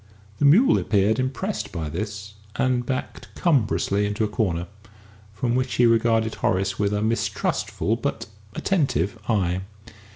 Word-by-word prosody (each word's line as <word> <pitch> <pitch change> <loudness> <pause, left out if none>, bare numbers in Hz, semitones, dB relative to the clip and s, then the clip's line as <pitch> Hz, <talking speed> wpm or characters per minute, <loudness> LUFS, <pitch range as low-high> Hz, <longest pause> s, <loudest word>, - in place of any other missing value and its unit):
The - - +2
mule 220 - +6
appeared 105 +2 +2
impressed 135 +11 -2
by 80 -4 -4
this, 105 +5 -5 0.2
and 125 -1 +1
backed 130 +2 -4
cumbrously 105 - +1
into 105 +2 -1
a - - +2
corner, 95 -5 -1 0.7
from 120 +3 -1
which 125 -1 0
he 120 - +4
regarded 115 -1 +3
Horace 95 +1 0
with 100 -1 +1
a 105 0 0
mistrustful, 115 +1 -1
but - - -3 0.3
attentive, 115 - 0
eye. 95 -4 +1
110 Hz, 135 wpm, -24 LUFS, 100-125 Hz, 0.7 s, mule